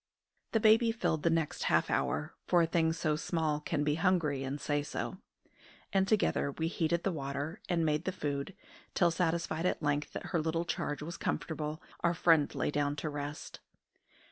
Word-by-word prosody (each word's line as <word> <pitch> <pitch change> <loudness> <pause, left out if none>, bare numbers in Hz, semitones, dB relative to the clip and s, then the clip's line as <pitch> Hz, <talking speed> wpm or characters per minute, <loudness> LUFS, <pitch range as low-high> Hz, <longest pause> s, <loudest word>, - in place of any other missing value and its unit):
The 225 - +4
baby 225 +1 +5
filled 225 -9 0
the 170 - +3
next 165 -2 0
half - - +2
hour, - - 0
for 175 -1 +5
a - - +4
thing 160 0 +2
so 160 -2 0
small 155 -1 -1
can 150 -1 -1
be 150 0 +2
hungry 165 -7 +2
and 135 +2 -3
say 145 +1 0
so; 145 - -4 0.7
and 195 -1 +3
together 200 -9 +2
we 160 +2 -1
heated 170 0 0
the 195 - +1
water 145 +3 -4
and 170 -2 +2
made 155 +2 +1
the 185 - 0
food, 145 +1 -3 0.4
till, 175 -2 +4
satisfied 165 0 0
at 165 - -1
length 145 0 0
that - - -5
her 170 - +2
little 165 +2 -1
charge 150 -3 -2
was 170 +2 -6
comfortable, 155 -1 -3 0.2
our 170 0 +1
friend 160 -3 +4
lay - - 0
down 145 0 0
to 155 +1 -3
rest. 145 0 -6
160 Hz, 185 wpm, -32 LUFS, 150-170 Hz, 0.7 s, baby